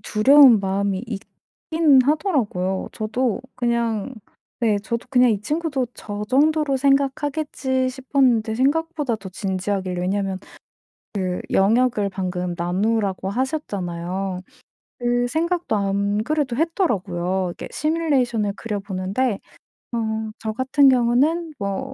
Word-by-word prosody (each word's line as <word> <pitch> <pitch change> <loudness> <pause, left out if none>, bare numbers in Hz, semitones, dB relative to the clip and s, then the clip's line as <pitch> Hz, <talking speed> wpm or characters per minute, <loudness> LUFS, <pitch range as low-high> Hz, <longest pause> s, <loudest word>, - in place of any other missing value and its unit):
두려운 255 +1 +6
마음이 195 0 -1
있긴 280 +7 0
하더라고요. 250 - 0
저도 230 +2 -1
그냥 235 -1 -1 0.5
네 215 -3 +2
저도 235 +4 -4
그냥 250 -1 +5
'이 205 - +1
친구도 295 -3 -1
저 205 0 -6
정도로 295 0 +3
생각하겠지.' 275 -1 0
싶었는데 255 -4 +1
생각보다 290 -1 0
더 195 -2 -9
진지하길래 190 -1 -2
왜냐면 190 +1 -1 0.8
그 185 -3 -2
영역을 215 +1 +3
방금 180 -2 -3
나누라고 190 +2 -1
하셨잖아요. 190 - -3 0.6
그 245 0 +1
생각도 335 -4 0
안 200 +1 0
그래도 290 -4 -1
했더라고요. 190 - 0
이렇게 - - -8
시뮬레이션을 265 -10 0
그려 210 -3 -4
보는데 195 +4 -1 0.5
좀 220 -1 -2
저 220 - -3
같은 265 +3 +3
경우는 270 +7 +2
뭐 200 +7 -3
230 Hz, 280 characters per minute, -22 LUFS, 195-270 Hz, 0.8 s, 두려운